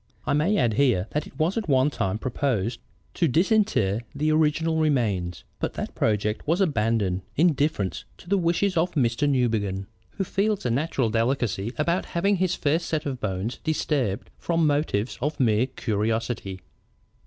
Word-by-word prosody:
I -, -, +1 dB
may 165 Hz, +9 st, +2 dB
add 120 Hz, -, +2 dB
here 120 Hz, -7 st, +2 dB
that 150 Hz, -, -2 dB
it -, -, -16 dB
was 170 Hz, +9 st, +1 dB
at 205 Hz, -7 st, -6 dB
one 135 Hz, +1 st, +3 dB
time 95 Hz, -6 st, -1 dB
proposed 120 Hz, -3 st, -1 dB, 0.3 s
to 170 Hz, -, +2 dB
disinter 160 Hz, -, +2 dB
the 155 Hz, +2 st, +1 dB
original 160 Hz, +1 st, +2 dB
remains, 110 Hz, -, 0 dB, 0.2 s
but -, -, -3 dB
that -, -, -4 dB
project 105 Hz, +2 st, 0 dB
was 165 Hz, +4 st, +2 dB
abandoned 110 Hz, -, +1 dB
in 165 Hz, +2 st, +4 dB
deference 140 Hz, -10 st, -1 dB
to -, -, -16 dB
the 200 Hz, +2 st, +2 dB
wishes 180 Hz, +3 st, +1 dB
of 170 Hz, +2 st, +1 dB
Mr. 130 Hz, 0 st, +1 dB
Newbegin, 110 Hz, -7 st, 0 dB, 0.3 s
who 195 Hz, -, +1 dB
feels 200 Hz, 0 st, -1 dB
a 120 Hz, -, +1 dB
natural 130 Hz, -3 st, 0 dB
delicacy 115 Hz, -2 st, 0 dB
about 170 Hz, +4 st, 0 dB
having 200 Hz, +3 st, +2 dB
his 185 Hz, 0 st, +1 dB
first 155 Hz, +3 st, 0 dB
set 155 Hz, -2 st, -1 dB
of 135 Hz, -3 st, -3 dB
bones 100 Hz, +3 st, -3 dB
disturbed 140 Hz, -9 st, -1 dB
from 165 Hz, -1 st, +1 dB
motives 145 Hz, -7 st, 0 dB
of 150 Hz, +4 st, -2 dB
mere 115 Hz, -1 st, +3 dB
curiosity." 110 Hz, -4 st, -2 dB
135 Hz, 165 wpm, -25 LUFS, 110-160 Hz, 0.3 s, in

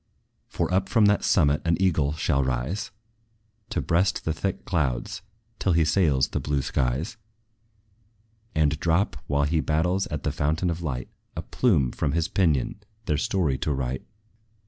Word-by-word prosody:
For -, -, -2 dB
up 95 Hz, +1 st, +1 dB
from 110 Hz, -2 st, +4 dB
that 100 Hz, 0 st, +3 dB
summit 75 Hz, -5 st, +3 dB
an 85 Hz, +1 st, +1 dB
eagle 80 Hz, -7 st, +2 dB
shall 75 Hz, -3 st, +1 dB
rise, 65 Hz, -, -2 dB, 0.8 s
To 110 Hz, -, -1 dB
breast 90 Hz, +3 st, +1 dB
the 80 Hz, -, +1 dB
thick 95 Hz, +4 st, -3 dB
clouds, 70 Hz, -10 st, -1 dB, 0.4 s
till 95 Hz, -, +2 dB
he 80 Hz, -1 st, +4 dB
sails 75 Hz, -6 st, +2 dB
the -, -, -2 dB
blue 70 Hz, -2 st, -1 dB
skies; 65 Hz, -, -1 dB, 1.4 s
And 75 Hz, -1 st, +2 dB
drop, 85 Hz, -2 st, +1 dB
while 70 Hz, 0 st, +1 dB
he 80 Hz, +3 st, +1 dB
bathes 90 Hz, +6 st, +1 dB
at -, -, -4 dB
the -, -, 0 dB
fountain 80 Hz, +4 st, 0 dB
of 85 Hz, +1 st, -5 dB
light, 65 Hz, -6 st, -4 dB, 0.3 s
A -, -, -4 dB
plume 80 Hz, -, +2 dB
from 70 Hz, -, -1 dB
his 85 Hz, 0 st, +1 dB
pinion 80 Hz, -2 st, +1 dB, 0.3 s
their 75 Hz, -5 st, +1 dB
story 80 Hz, -8 st, 0 dB
to 75 Hz, -, -1 dB
write. 65 Hz, -1 st, -2 dB
80 Hz, 160 wpm, -26 LUFS, 70-90 Hz, 1.4 s, from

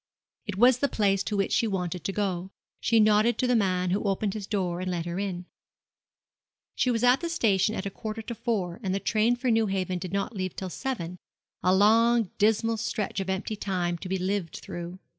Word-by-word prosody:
It 205 Hz, -2 st, -4 dB
was 245 Hz, +3 st, +5 dB
the 280 Hz, -, +2 dB
place 195 Hz, -3 st, +2 dB
to 210 Hz, -, -1 dB
which 195 Hz, -, 0 dB
she 230 Hz, -, +2 dB
wanted 180 Hz, -4 st, -3 dB
to -, -, 0 dB
go. 190 Hz, -3 st, -2 dB, 0.3 s
She 230 Hz, -1 st, +3 dB
nodded 215 Hz, +2 st, +4 dB
to -, -, +1 dB
the 250 Hz, 0 st, +3 dB
man, 185 Hz, -4 st, +1 dB
who 195 Hz, -, +1 dB
opened 200 Hz, 0 st, 0 dB
his 210 Hz, -3 st, -6 dB
door 180 Hz, -4 st, -1 dB
and 185 Hz, -, -2 dB
let 170 Hz, -2 st, -2 dB
her 175 Hz, +2 st, -3 dB
in. 185 Hz, -3 st, -3 dB, 1.3 s
She 255 Hz, -, +1 dB
was 235 Hz, -1 st, 0 dB
at 250 Hz, +2 st, +5 dB
the 340 Hz, -, -2 dB
station 220 Hz, -, +2 dB
at 190 Hz, -, -4 dB
a 200 Hz, -, -3 dB
quarter 220 Hz, +2 st, -6 dB
to 235 Hz, -, -5 dB
four, 200 Hz, -7 st, -2 dB
and 190 Hz, -3 st, -1 dB
the -, -, 0 dB
train 225 Hz, +3 st, +2 dB
for 245 Hz, 0 st, 0 dB
Newhaven 195 Hz, -5 st, 0 dB
did 180 Hz, 0 st, -6 dB
not 200 Hz, +3 st, -2 dB
leave 185 Hz, -2 st, -3 dB
till 185 Hz, -2 st, -5 dB
seven 180 Hz, -10 st, -4 dB, 0.4 s
a 180 Hz, -, +3 dB
long 225 Hz, +2 st, +4 dB
dismal 225 Hz, +2 st, +2 dB
stretch 215 Hz, -2 st, -2 dB
of 190 Hz, 0 st, -3 dB
empty 190 Hz, +3 st, -2 dB
time 180 Hz, -4 st, -1 dB
to 185 Hz, -, -7 dB
be 190 Hz, -, 0 dB
lived 185 Hz, -2 st, -2 dB
through. 175 Hz, +1 st, -7 dB
200 Hz, 215 wpm, -27 LUFS, 185-225 Hz, 1.3 s, was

